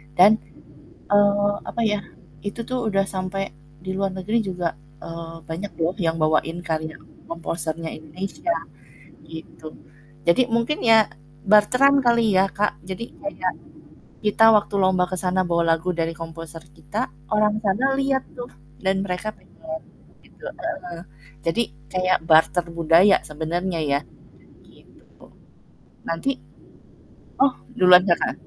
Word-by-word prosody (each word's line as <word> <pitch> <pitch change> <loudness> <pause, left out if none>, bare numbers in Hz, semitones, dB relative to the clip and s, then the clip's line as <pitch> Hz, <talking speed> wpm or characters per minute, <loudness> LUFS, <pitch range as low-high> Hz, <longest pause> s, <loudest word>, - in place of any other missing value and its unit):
dan, 205 +5 +7 0.7
eee, 205 0 +4 0.2
apa 235 - -3
ya, 210 -2 +1 0.4
itu 205 +6 -5
tuh 250 -1 -2
udah 195 -2 +2
sampai 195 0 -3 0.3
di 190 - -4
luar 190 0 -2
negeri 215 +5 0
juga, 180 -4 -2 0.4
eee, 165 0 -7
banyak 165 +6 -6
loh 165 +1 0
yang 165 -2 +1
bawain 160 +2 0
karya 160 -1 -3 0.3
komposernya 165 -1 -4
Indonesia 185 - -4 0.7
gitu, 160 -1 -10 0.5
jadi 245 +9 +3
mungkin 235 +6 0
ya 225 -2 +5 0.3
barteran 250 +7 +5
kali 235 -3 +3
ya 190 +1 +4
Kak, 205 +1 -1
jadi 190 +4 -6 0.2
kayak 300 - -2 0.7
kita 215 +1 +4
waktu 210 -1 +2
lomba 185 -1 +3
ke 185 - -4
sana 185 0 +1
bawa 170 0 +2
lagu 165 +2 0
dari 165 0 -1
komposer 165 -1 -8
kita, 145 - -5 0.3
orang 210 0 +3
sana 250 +7 +2
liat 270 -1 +1
tuh 245 -1 -8 0.3
dan 190 0 +1
mereka 185 +4 -3
pengen 320 0 -9 0.4
begitu, - - -17
heeh. 180 - -6 0.4
Jadi 200 +8 +2 0.3
kayak 185 0 +2
barter 165 +2 +4
budaya 170 +4 +5
sebenarnya 165 +4 -2
ya, 140 - +3 0.7
gitu. - - -21 0.8
Nanti 165 +11 -1 1.1
oh 270 -1 +4 0.2
duluan 180 0 +8
Kakak. 170 - +2
185 Hz, 125 wpm, -23 LUFS, 165-215 Hz, 1.1 s, duluan